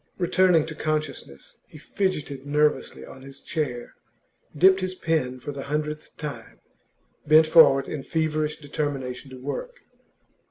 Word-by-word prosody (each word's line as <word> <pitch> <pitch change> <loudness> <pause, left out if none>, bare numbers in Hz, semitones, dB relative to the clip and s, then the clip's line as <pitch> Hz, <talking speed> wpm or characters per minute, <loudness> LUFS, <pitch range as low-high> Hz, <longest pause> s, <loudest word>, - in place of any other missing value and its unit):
Returning 180 -2 +3
to 160 - -7
consciousness, 155 - -4
he - - -14
fidgeted 150 -5 -3
nervously 150 -1 0
on 130 - -13
his 135 0 -12
chair, 135 -7 -4 0.6
dipped 190 +4 +6
his 185 0 -3
pen 150 -8 -1
for 145 - -6
the 140 -1 -7
hundredth 150 +1 -4
time, 150 -2 -8 0.7
bent 155 +1 +7
forward 155 -4 +6
in 150 - -5
feverish 155 0 -1
determination 140 -3 -4
to 130 - -10
work. - - -6
150 Hz, 130 wpm, -25 LUFS, 135-160 Hz, 0.7 s, bent